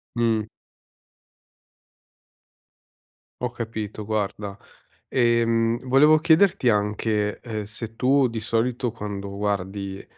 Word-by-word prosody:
Mh. 110 -2 +1 2.9
Ho 125 -1 -1
capito, 110 -3 -5
guarda. 105 -1 -3 0.5
Ehm, 115 -1 +2
volevo 150 +4 +6
chiederti 170 -2 +4
anche, 105 0 0
uhm, 110 -3 -4
se 110 +1 -7
tu 130 +1 +3
di 115 -1 -4
solito 120 +3 -1
quando 100 -3 -6
guardi, 100 -1 -3
115 Hz, 90 wpm, -24 LUFS, 105-120 Hz, 2.9 s, volevo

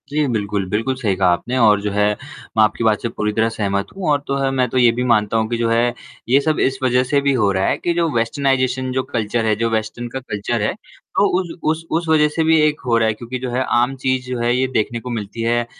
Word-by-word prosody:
जी 150 +1 +1
बिल्कुल। 105 -4 -1
बिल्कुल, 115 +6 -1
सही 110 -7 -1
कहा 95 0 +2
आपने 120 +9 -1
और 105 -4 +4
जो 105 0 -2
है 105 +1 +2 0.5
मैं 110 - +6
आपकी 110 +2 0
बात 110 -2 +2
से 115 - -2
पूरी 105 -2 -2
तरह 110 +1 +1
सहमत 100 -3 -2
हूँ 190 -5 -2
और 145 - +3
तो 140 - -1
है 135 0 0
मैं 130 -1 +1
तो 130 - -2
ये 120 -2 +5
भी 120 +2 -2
मानता 105 0 +2
हूँ 110 0 +1
कि 120 - -1
जो 115 0 0
है 120 +1 +2 0.4
ये 135 +3 +5
सब 155 +1 0
इस 135 0 +1
वज़ह 125 0 +3
से 140 +2 +1
भी 140 0 +2
हो 105 -6 +2
रहा 95 0 0
है - - +1
कि 175 - -1
जो 170 -1 +1
वेस्टर्नाइज़ेशन 130 +1 0
जो 130 0 -1
कल्चर 115 -3 -2
है, 110 -1 +2
जो 115 +2 -1
वेस्टर्न 110 +2 -3
का 135 - -2
कल्चर 115 -2 -3
है, 105 - 0 0.4
तो 200 - +4
उ - - -1 0.3
उस 160 +1 -4
उस 165 +1 0
वज़ह 155 -1 +4
से 160 - +2
भी 160 0 +4
एक 150 0 +2
हो 120 -2 +2
रहा 115 -1 +2
है 110 - +1
क्योंकि 120 +3 -6
जो 130 0 -4
है 125 +2 0
आम 125 +3 +1
चीज़ 130 -1 0
जो 125 -1 -3
है 120 +1 +1
ये 130 +1 +1
देखने 115 +2 0
को 125 - -8
मिलती 110 -1 -5
है 120 +1 +1
120 Hz, 275 wpm, -19 LUFS, 110-130 Hz, 0.5 s, मैं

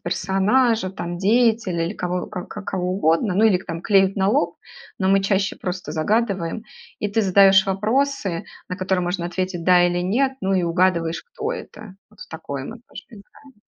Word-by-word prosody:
персонажа, 195 +4 +1
там 175 -2 -6
деятеля 215 -4 +2
или 190 - -4
кого 180 -1 -3
к 180 -4 -6 0.2
кого 180 -2 -2
угодно. 180 +1 +1
Ну 205 - +2
или 215 -4 +5
к 190 - -15
там 165 -1 -5
клеят 195 -1 +3
на 190 -1 +1
лоб, 170 -4 0 0.4
но 190 - +1
мы 195 0 +4
чаще 195 0 0
просто 180 -4 -5
загадываем. 195 +3 -1 0.4
И 210 - -1
ты 205 +2 0
задаешь 195 0 +5
вопросы, 210 -1 -1 0.2
на 180 - -4
которые 185 -1 -1
можно 175 0 -2
ответить 180 -1 -3
"да" 180 -1 +5
или 175 0 +1
"нет", 260 +9 +1
ну 195 0 0
и 185 - +1
угадываешь, 170 -1 +1
кто 460 -2 -5
это. 215 - -10
Вот 215 - -21
в - - -10
такое 140 -4 -6
мы 225 - -8
тоже - - -11
играем. 235 +6 -17
190 Hz, 185 wpm, -22 LUFS, 175-210 Hz, 0.4 s, или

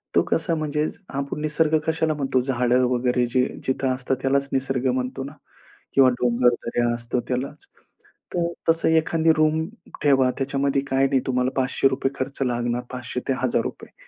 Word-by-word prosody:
तो - - +6
कसा 165 +1 +1
म्हणजे 150 -1 -1 0.3
आपण 140 +2 -3
निसर्ग 155 +1 +2
कशाला 160 -1 +1
म्हणतो? 135 -3 0
झाडं 125 -1 +2
वगैरे 125 0 +1
जे 125 +1 +2 0.2
जिथं 130 0 0
असतात 130 +1 -1
त्यालाच 140 +1 +1
निसर्ग 135 -1 0
म्हणतो 130 +1 -3
ना? 140 +2 -8 0.6
किंवा 135 -1 +6
डोंगरदऱ्या 120 0 +2
असतात 120 +1 -2
त्यालाच. 130 - -4 0.7
तर 170 -1 +1 0.2
तसं 165 0 +3
एखादी 160 0 +3
रूम 155 +1 +2 0.4
ठेवा. 135 -3 +4
त्याच्यामध्ये 135 0 0
काही 135 0 +2
नाही 135 -1 +1
तुम्हाला 125 0 +1
₹500 135 +1 +1
खर्च 135 +1 -4
लागणार, 120 -1 -1
500 125 0 -4
ते 135 - +2
₹1000 130 - -3
135 Hz, 150 wpm, -23 LUFS, 125-145 Hz, 0.7 s, तो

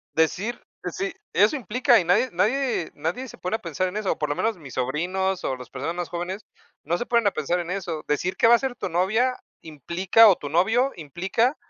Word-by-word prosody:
Decir 190 +9 0 0.2
decir 390 -1 -3 0.2
eso 210 +9 +4
implica, 245 +2 +3
y 180 - 0
nadie 205 +9 +3
nadie 225 +1 0
nadie 175 - -3
se - - -12
pone 185 +5 -1
a - - -13
pensar 175 +2 -2
en 180 - -7
eso, 210 -3 0
o - - -5
por 150 - -1
lo 145 - 0
menos 220 +4 -1
mis 140 -6 -11
sobrinos, 180 +9 -1
o 130 - -1
las 125 - -11
personas 140 +6 -4
más 175 -1 -3
jóvenes, 180 +4 -4 0.4
no 170 +4 0
se 240 - -3
ponen 235 -2 +2
a - - +5
pensar 170 +2 -1
en 175 0 -5
eso. 180 -5 -4
Decir 175 +5 -1
qué - - +4
va 235 - +8
a - - -3
ser 265 -1 -3
tu 190 - -3
novia 220 +9 +1 0.2
implica, 170 - +4
o 195 - +5
tu 145 - -7
novio 225 - +2
implica, 190 - -1
185 Hz, 225 wpm, -24 LUFS, 165-230 Hz, 0.4 s, va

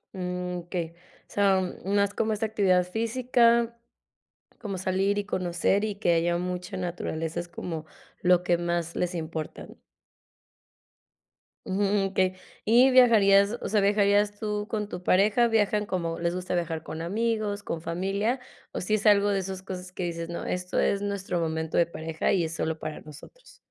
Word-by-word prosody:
Mm, 180 -1 -3
okey, 175 -1 -4
o - - -23 0.3
sea, 195 -2 +3 0.3
no 200 +1 +2
es 200 0 -2
como 220 0 0
esa 215 +1 -1
actividad 195 -4 +3
física, 235 +2 +2 0.8
como 200 -3 -4
salir 190 +2 0
y 205 - 0
conocer 185 +2 0
y 210 -2 -3
que 190 -4 +2
haya 170 +1 +2
mucha 180 0 -4
naturaleza, 170 -3 -3
es 175 - -5
como 165 -2 -6 0.4
lo 180 0 +4
que 175 -1 +2
más 170 -1 -2
les 180 0 -1
importa. 160 -1 -5 2.0
Ujú, 200 0 +1
okey, 185 -1 +2 0.3
y 245 +4 +6
¿viajarías 215 -4 +5
o - - -3
sea, 215 - +3
viajarías 205 0 +3
tú 210 -1 -3
con 210 -2 -2
tu 175 - -6
pareja? 205 +6 +4
¿Viajan 210 -2 +1
como? 170 -4 -2
¿Les 170 +1 -1
gusta 180 0 -3
viajar 165 -2 -2
con 160 - -6
amigos, 210 +2 -1
con 165 - -3
familia? 195 +9 -1 0.3
O - - -3
si 215 +4 +1
es 215 - -3
algo 205 -1 +5
de 200 -1 +1
esas 190 0 -5
cosas 180 -1 -7
que 185 - -4
dices: 170 -1 -3
"No, 170 - -5
esto 180 0 -3
es 200 - +2
nuestro 200 -3 -2
momento 160 -1 -2
de 170 - +5
pareja 160 -1 -2
y 180 -3 +2
es 160 - -3
solo 160 0 -2
para 155 -1 -5
nosotros". 155 - -14
190 Hz, 170 wpm, -27 LUFS, 175-205 Hz, 2.0 s, y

